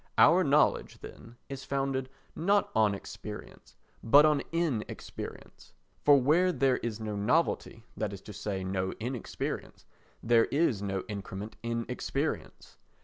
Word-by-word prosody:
Our 180 +3 +7
knowledge, 150 0 +2
then, 115 +1 -11
is 135 -1 -7
founded 135 -1 -1 0.3
not 200 +4 +2
on 105 -2 +3
experience - - -9 0.3
but 145 +6 +7
on 150 -2 +3
inexperience; 165 -10 -4 0.3
for 145 -1 +7
where 165 +8 +3
there 135 -4 +2
is 115 -2 -4
no 110 -1 -4
novelty, 115 +1 0
that 110 -2 -2
is 100 -2 -8
to 105 - -10
say 95 -1 -3
no 95 0 -2
inexperience, 120 +1 -5 0.4
there 115 0 +5
is 140 -8 +1
no 95 -2 -2
increment 105 0 -6
in 115 0 -2
experience. - - -4
115 Hz, 135 wpm, -30 LUFS, 105-140 Hz, 0.4 s, Our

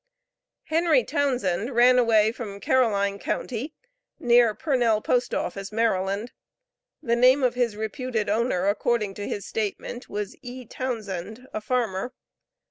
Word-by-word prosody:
Henry 315 -5 +2
Townsend 250 - -1
ran 250 +1 +6
away 220 -2 +4
from 215 -4 -7
Caroline 200 -4 +1
county, 255 +9 -4 0.4
near 240 -3 +4
Purnell 245 -8 +1
P.O., 245 +3 0 0.2
Maryland. 210 0 0 0.7
The 235 -1 +1
name 255 +3 +5
of 250 - +3
his 245 -3 0
reputed 220 +1 -3
owner, 210 -3 +1
according 210 0 0
to 205 +1 -6
his 200 - -4
statement, 220 +3 -4
was 210 - -4
E. 250 -1 -8
Townsend, 220 -2 -5
a 215 - -3
farmer. 235 0 -2
230 Hz, 125 wpm, -25 LUFS, 210-250 Hz, 0.7 s, ran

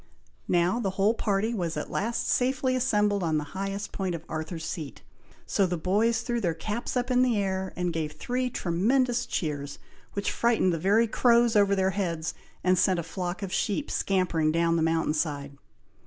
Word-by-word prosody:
Now, 175 +5 +2
the 205 -5 0
whole 205 +3 +4
party 215 0 0
was 175 -6 -2
at - - -4
last 230 +4 -1
safely 255 0 +1
assembled 210 -5 +2
on 160 -3 +1
the 150 - -1
very 145 - -13 0.2
highest 200 +1 -4
point 185 -3 -2
of 165 0 -8
Arthur's 160 +1 -5
Seat, 155 - -6 0.4
so 195 - +2
the 175 0 -2
boys 215 +7 +1
threw 240 -1 -2
their 170 -5 0
caps 215 +8 -3
up 250 +1 -1
in 250 0 +4
the 250 -4 +3
air, 190 -1 -1
and 180 -1 -1
gave 155 -2 -2
three 250 +11 -2
tremendous 240 +7 +1
cheers, 145 -3 -3 0.4
which 200 - -1
frightened 230 -6 +2
the 165 - -2
very 205 +7 +4
crows 235 0 +3
over 200 -1 +4
their 190 0 +2
heads, 170 -5 -2 0.3
and 185 0 +3
sent 185 -1 +3
a 170 - -2
flock 180 +3 -4
of 190 - -4
sheep 225 +8 -1
scampering 175 -5 +1
down 165 +1 +2
the 165 - +1
mountain 160 -1 +1
side. 145 -3 -2
190 Hz, 190 wpm, -27 LUFS, 165-230 Hz, 0.4 s, whole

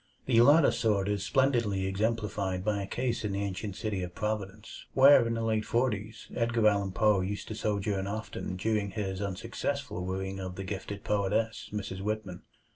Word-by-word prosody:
The 115 -3 +5
latter 145 +5 +6
sort 100 -4 +1
is 100 -1 -1
splendidly 120 -8 +2
exemplified 100 -2 -1
by 105 -2 +1
a 100 - -4
case 120 +1 -2
in 105 -2 -2
the 100 +1 -1
ancient 100 0 -4
city 105 -4 -2
of 90 -1 -6
Providence, 105 0 -4
where 135 -3 +7
in 115 - -1
the 115 - -2
late 110 -1 +1
forties 110 -3 -1
Edgar 115 -2 +2
Allan 100 -2 0
Poe 105 -1 +3
used 100 +1 -4
to - - -3
sojourn 100 -2 -1
often 105 -2 -4
during 105 +1 0
his 95 -1 -3
unsuccessful 115 +4 -3
wooing 95 +1 -3
of 95 -1 -5
the 95 - -5
gifted 100 +1 -5
poetess, 105 +2 0
Mrs. 95 -2 -4
Whitman. 105 -3 -3
105 Hz, 175 wpm, -30 LUFS, 95-115 Hz, -, where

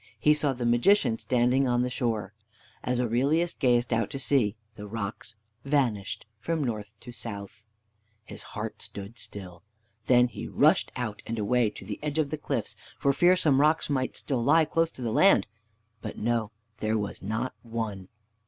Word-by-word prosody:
He 150 - +5
saw 150 -2 +1
the 120 -1 -4
Magician 120 - +3
standing 125 +2 +2
on 120 0 +2
the 125 - -1
shore. 110 -6 -2 0.5
As 125 -1 0
Aurelius 140 +9 +1
gazed 120 -2 +2
out 115 -2 +1
to - - -5
sea, 130 -6 +1 0.2
the 105 -1 -9
rocks 110 +1 -5 0.3
vanished 125 -10 0
from 160 +6 -1
north 110 -4 -4
to 125 - -9
south. 110 -1 -7 0.6
His - - -6 0.2
heart - - -5
stood 100 +4 -7
still. 90 -4 -8 0.5
Then 125 -1 +6
he 120 - -7
rushed - - +3
out 110 -4 -4
and 115 - -3
away 115 +2 +2
to 95 - -11
the 105 +1 -5
edge 150 0 -3
of 150 -3 +1
the 155 - -3
cliffs 120 -8 -2 0.2
for 140 - +2
fear 175 +5 +5
some 150 -7 +3
rocks 155 0 +3
might 130 -2 -1
still 130 -5 -1
lie 160 +5 +5
close 165 +2 +1
to 130 - -9
the 115 - -1
land. 195 - +5 0.6
But - - -6
no, 115 -1 0 0.3
there 110 +1 0
was 105 -1 -4
not 110 +6 -2
one. 110 -5 -4
120 Hz, 175 wpm, -28 LUFS, 110-140 Hz, 0.6 s, Then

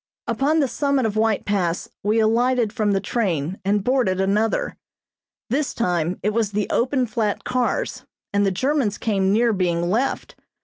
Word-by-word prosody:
Upon 275 +6 +1
the 275 - +2
summit 280 -1 0
of 215 -1 -1
White 220 -1 +1
Pass 185 -4 -1
we 210 +2 +1
alighted 235 0 +2
from 210 -4 +1
the 195 - +2
train 185 - -2
and 200 +1 +1
boarded 245 -7 +1
another. 215 - 0 0.8
This 280 +3 0
time 175 -5 0
it 210 - +1
was 220 -2 0
the 210 0 0
open 255 +2 +1
flat 215 -2 -2
cars, 255 - -1 0.3
and 205 0 +3
the 195 - +3
Germans 255 +1 0
came 195 -3 +1
near 230 +2 +3
being 175 -2 0
left. 245 +6 -1
215 Hz, 165 wpm, -22 LUFS, 195-250 Hz, 0.8 s, and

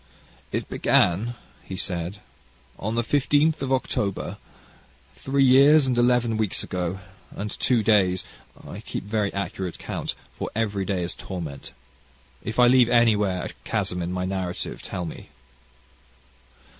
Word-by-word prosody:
"It - - -2
began," 105 +8 +2 0.3
he 95 - -7
said, 90 +1 -3 0.6
"on 110 +3 -2
the 120 - +1
15th 145 +4 +2
of 135 -1 -2
October, 105 -6 -1 0.8
three 135 0 +1
years 140 +3 +7
and 130 -2 +1
eleven 120 -2 +3
weeks 110 -3 0
ago, 90 +1 -3 0.3
and 105 +1 -5
two 120 -4 +1
days 95 -4 +3 0.4
I - - -7
keep - - -5
very 105 0 -1
accurate 95 -2 -4
count, - - -4 0.2
for - - -4
every 105 -3 -1
day 95 -2 -1
is 85 - -3
torment. 80 -7 -7 0.7
If 110 - -5
I 125 - +7
leave 125 -1 +6
anywhere 105 -6 +3
a - - -4
chasm 90 0 -1
in 85 +1 -3
my 90 0 -2
narrative 95 -2 -3
tell 90 - -4
me. 80 - -8
105 Hz, 140 wpm, -25 LUFS, 90-120 Hz, 0.8 s, years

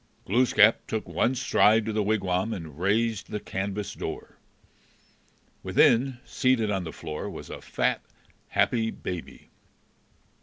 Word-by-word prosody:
Glooskap 115 0 +4
took 110 - -3
one 125 +3 +1
stride 110 -3 +3
to 110 - -2
the 105 - +1
wigwam 100 0 0
and 80 -4 -8
raised 110 +3 0
the 105 - -3
canvas 100 0 -4
door. - - -7 1.2
Within, 125 +2 +3
seated 125 -5 +1
on 95 -3 -1
the 80 - -5
floor, 75 0 -6
was - - -9
a - - -7
fat, - - -1 0.5
happy 115 -2 +1
baby. 90 -6 -7
105 Hz, 125 wpm, -27 LUFS, 95-115 Hz, 1.2 s, Glooskap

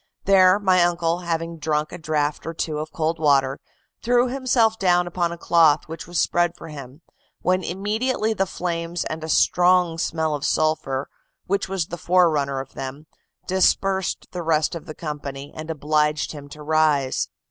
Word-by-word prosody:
There 190 -1 +6
my 190 -3 +3
uncle, 170 0 0
having 165 -1 -3
drunk 150 0 -1
a - - -8
draught 150 -1 -1
or 165 - -4
two 155 -2 -2
of 155 +1 -5
cold 165 0 -1
water, 140 -3 +2 0.4
threw 245 +1 +2
himself 245 -4 +1
down 180 -2 +3
upon 175 -1 -1
a 170 - -6
cloth 165 -3 +3
which 165 +1 -8
was 175 -1 -2
spread 175 0 +1
for 165 - -10
him, 140 +1 -10 0.4
when 185 0 +1
immediately 215 +5 -1
the 195 -2 0
flames, 170 -1 -3
and 155 0 -5
a 160 - -5
strong 180 -1 +3
smell 160 -1 -1
of 145 -1 -4
sulphur 145 -3 0 0.4
which 195 0 -1
was 190 -4 -1
the 175 - -6
forerunner 155 -6 +2
of 135 0 -8
them, 135 +3 -7 0.4
dispersed 190 0 +1
the 180 - -4
rest 160 -2 +1
of 170 +1 -7
the 155 - -7
company, 145 -2 -6
and 155 +1 -7
obliged 150 -1 0
him 145 -2 -10
to 150 +1 -10
rise. 150 -3 +1
165 Hz, 170 wpm, -23 LUFS, 150-180 Hz, 0.4 s, There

